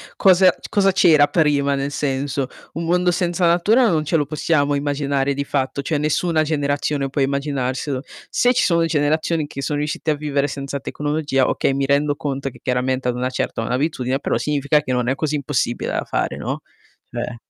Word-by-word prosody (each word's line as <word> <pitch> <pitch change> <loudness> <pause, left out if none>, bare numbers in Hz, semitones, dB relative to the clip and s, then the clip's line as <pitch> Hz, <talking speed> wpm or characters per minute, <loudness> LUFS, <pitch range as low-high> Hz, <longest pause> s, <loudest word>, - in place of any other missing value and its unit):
cosa 185 -1 +6
c - - -12
cosa 195 -1 +3
c'era 155 -6 +5
prima, 145 -4 +2
nel 140 +1 -2
senso, 140 -1 -2 0.3
un 165 +1 -4
mondo 180 +1 +2
senza 175 0 0
natura 215 +8 +4
non 155 -3 +1
ce 165 - 0
lo 145 - 0
possiamo 145 -2 +1
immaginare 140 -1 0
di 140 +1 -2
fatto, 135 -1 -2
cioè, 150 +2 -1
nessuna 155 +2 +1
generazione 145 -2 -1
può 145 - -3
immaginarselo. 135 -1 -1 0.3
Se 245 +1 +3
ci 250 - +2
sono 170 -2 +3
generazioni 155 0 0
che 140 -1 -7
sono 145 +1 -1
riuscite 150 +1 -2
a - - +1
vivere 145 -1 -1
senza 140 0 -5
tecnologia, 145 -2 -1
okay, - - +1
mi 135 0 0
rendo 145 +1 +2
conto 140 -2 -3
che, - - -16
chiaramente, 130 0 -1
hanno 125 - -2
una 125 +1 -1
certa 115 - -2
un'abitudine, 130 +1 -1
però - - -1
significa 150 0 +1
che 130 - -3
non 125 0 0
è 135 - +1
così 150 +2 -1
impossibile 135 -4 -1
da - - -2
fare, - - -2
no. - - -4 0.5
Cioè 120 - -4
145 Hz, 190 wpm, -20 LUFS, 135-155 Hz, 0.5 s, cosa